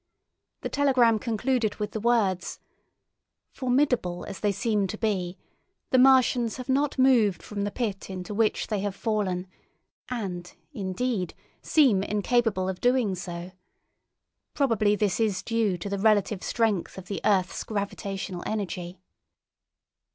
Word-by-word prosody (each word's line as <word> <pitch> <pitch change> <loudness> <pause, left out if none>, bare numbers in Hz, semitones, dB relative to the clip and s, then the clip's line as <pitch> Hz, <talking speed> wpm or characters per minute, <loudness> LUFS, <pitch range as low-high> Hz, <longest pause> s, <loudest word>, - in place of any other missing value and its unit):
The - - -3
telegram 255 -6 +3
concluded 230 -1 0
with 210 0 -4
the 220 - -3
words: 210 -6 +1 0.9
"Formidable 250 -9 0
as - - -7
they 205 - +1
seem 210 -1 0
to 215 - -5
be, 190 -5 -1 0.5
the 255 - +5
Martians 255 -3 +4
have 255 - -7
not 280 +2 +1
moved 245 -7 +4
from 205 -1 -3
the - - -1
pit 205 -4 -3
into 185 +1 -6
which 215 +1 +1
they 210 -2 -2
have 200 0 -3
fallen, 200 -5 -1 0.6
and, 185 -8 -4 0.2
indeed, 195 0 -2 0.3
seem 260 -11 +4
incapable 210 -1 +1
of 190 -1 -4
doing 245 -5 +2
so. 175 -1 -6 1.0
Probably 220 -7 +2
this 205 -2 0
is 210 -4 0
due 225 -5 0
to 175 - -6
the 200 0 -2
relative 210 -2 +2
strength 220 -7 0
of 190 - -8
the 200 +1 -4
earth's 190 -3 +1
gravitational 200 -3 -4
energy." 185 -4 -4
210 Hz, 135 wpm, -27 LUFS, 190-235 Hz, 1.0 s, the